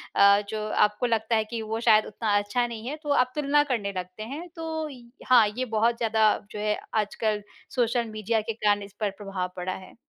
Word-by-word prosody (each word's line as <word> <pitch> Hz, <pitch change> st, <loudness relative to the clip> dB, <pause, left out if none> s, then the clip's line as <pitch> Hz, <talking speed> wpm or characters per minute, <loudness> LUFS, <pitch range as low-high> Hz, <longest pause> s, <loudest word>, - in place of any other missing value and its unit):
अ, 200 Hz, 0 st, +6 dB
जो 215 Hz, -1 st, -3 dB, 0.2 s
आपको 210 Hz, +3 st, -2 dB
लगता 225 Hz, -1 st, +1 dB
है 220 Hz, -, +2 dB
कि 230 Hz, -, -3 dB
वो 220 Hz, +1 st, -3 dB
शायद 215 Hz, 0 st, +6 dB
उतना 215 Hz, 0 st, -1 dB
अच्छा 205 Hz, +4 st, 0 dB
नहीं 230 Hz, 0 st, -7 dB
है, 295 Hz, -, -3 dB
तो 295 Hz, -, -5 dB
आप 255 Hz, -3 st, +3 dB
तुलना 295 Hz, 0 st, +3 dB
करने 230 Hz, -8 st, -2 dB
लगते 185 Hz, +4 st, -6 dB
हैं। 290 Hz, +9 st, -6 dB
तो 320 Hz, -1 st, -3 dB
इ 250 Hz, -3 st, -11 dB, 0.3 s
हाँ, 240 Hz, -4 st, +7 dB
ये 255 Hz, -, 0 dB
बहुत 230 Hz, +1 st, +1 dB
ज़्यादा 220 Hz, -2 st, +3 dB
जो 210 Hz, -, -6 dB
है 210 Hz, 0 st, 0 dB, 0.2 s
आजकल 210 Hz, 0 st, -2 dB, 0.3 s
सोशल 240 Hz, -1 st, +1 dB
मीडिया 215 Hz, +1 st, 0 dB
के 225 Hz, -, +1 dB
कारण 205 Hz, -2 st, +1 dB
इस 200 Hz, 0 st, -12 dB
पर 210 Hz, -, +2 dB
प्रभाव 190 Hz, -2 st, -3 dB
पड़ा 185 Hz, +1 st, -3 dB
है। 185 Hz, -, -11 dB
220 Hz, 215 wpm, -26 LUFS, 205-245 Hz, 0.3 s, हाँ